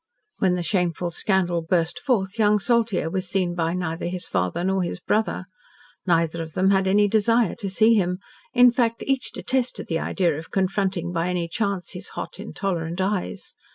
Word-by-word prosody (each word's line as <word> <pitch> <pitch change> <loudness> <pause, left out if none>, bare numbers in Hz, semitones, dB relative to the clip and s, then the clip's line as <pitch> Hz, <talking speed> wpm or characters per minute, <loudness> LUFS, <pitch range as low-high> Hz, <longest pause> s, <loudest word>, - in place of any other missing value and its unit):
When 185 -2 +3
the 180 -1 -1
shameful 175 -2 0
scandal 175 -2 +1
burst 165 0 0
forth 220 -6 -1
young 210 -1 +4
Saltyre 225 -6 +1
was 185 -1 -2
seen 185 -2 0
by 165 0 -1
neither 170 -2 -3
his 180 0 -3
father 90 - -1
nor 190 +1 +1
his 175 0 -3
brother. 210 -1 0 0.6
Neither 165 -1 +2
of 160 -1 -7
them 190 +1 +3
had 190 -1 +2
any 205 +2 +4
desire 225 +1 +3
to 200 - -3
see 220 +4 +4
him; 180 -4 +1 0.3
in 245 0 +6
fact, 235 -2 0
each 270 -1 -1
detested 255 -2 -2
the 165 -1 0
idea 170 -3 0
of 165 - -10
confronting 190 -2 0
by 170 0 -1
any 175 -2 -1
chance 200 0 -2
his - - -6
hot, - - -6
intolerant 175 -3 -3
eyes. 190 0 -2
185 Hz, 180 wpm, -24 LUFS, 175-210 Hz, 0.6 s, in